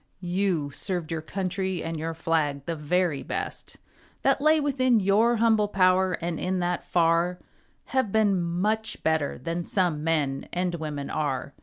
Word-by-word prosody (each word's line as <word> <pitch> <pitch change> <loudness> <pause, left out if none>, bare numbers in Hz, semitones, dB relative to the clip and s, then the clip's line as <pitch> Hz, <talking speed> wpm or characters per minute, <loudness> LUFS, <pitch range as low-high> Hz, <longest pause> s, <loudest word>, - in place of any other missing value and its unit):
You 180 -7 0
served 175 0 -4
your 160 -1 -2
country 190 +1 -3
and 165 -1 -4
your 165 +1 -3
flag 150 -4 0
The 165 - -2
very 160 -1 0
best - - -5 0.5
That - - +3
lay 310 +1 +5
within 255 -5 +2
your 210 +5 +3
humble 220 -2 +3
power, 185 -1 +3
And 170 0 -3
in 185 +1 -1
that 175 0 -1
far 170 +1 +2 0.5
Have 260 -6 0
been 205 -4 +3
much 205 +6 -1
better 160 -3 0
than 165 +6 -3
some 170 -5 0
men 150 -4 0
And 180 0 -1
women 150 -4 -4
are. 140 -2 -2
175 Hz, 155 wpm, -26 LUFS, 160-195 Hz, 0.5 s, lay